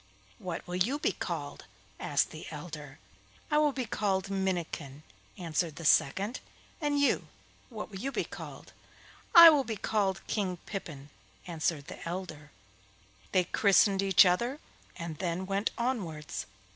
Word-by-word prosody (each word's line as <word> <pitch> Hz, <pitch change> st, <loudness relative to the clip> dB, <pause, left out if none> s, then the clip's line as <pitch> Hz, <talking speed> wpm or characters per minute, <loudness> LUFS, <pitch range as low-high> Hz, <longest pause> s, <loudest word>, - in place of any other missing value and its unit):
'What 175 Hz, -2 st, -5 dB
will 180 Hz, 0 st, -4 dB
you 235 Hz, +11 st, +1 dB
be -, -, +1 dB
called?' -, -, -5 dB, 0.3 s
asked -, -, +1 dB
the -, -, -9 dB
elder. -, -, -8 dB, 0.5 s
'I 300 Hz, -, +4 dB
will 300 Hz, -1 st, +4 dB
be 260 Hz, -2 st, -3 dB
called 195 Hz, -3 st, -1 dB
Minnikin,' 170 Hz, -7 st, -3 dB, 0.3 s
answered 165 Hz, -2 st, -2 dB
the 165 Hz, -, -8 dB
second; 195 Hz, -, +3 dB, 0.4 s
'and 290 Hz, -1 st, +1 dB
you, 285 Hz, -, +2 dB, 0.4 s
what 215 Hz, -3 st, -7 dB
will 190 Hz, -, -7 dB
you 270 Hz, +6 st, -3 dB
be -, -, -1 dB
called?' -, -, -10 dB, 0.6 s
'I 335 Hz, -1 st, +12 dB
will 290 Hz, -3 st, +3 dB
be 225 Hz, -3 st, -4 dB
called 195 Hz, -2 st, -1 dB
King 190 Hz, -4 st, -1 dB
Pippin,' 145 Hz, -8 st, -7 dB, 0.3 s
answered 160 Hz, -3 st, -2 dB
the -, -, -9 dB
elder. 165 Hz, -5 st, -6 dB, 0.8 s
They 185 Hz, -, +4 dB
christened 195 Hz, +1 st, +4 dB
each 195 Hz, -1 st, +6 dB
other 235 Hz, +11 st, +1 dB, 0.4 s
and 170 Hz, -3 st, -6 dB
then 180 Hz, +1 st, -2 dB
went 195 Hz, +2 st, 0 dB
onwards. 185 Hz, -, -3 dB
190 Hz, 145 wpm, -30 LUFS, 170-220 Hz, 0.8 s, I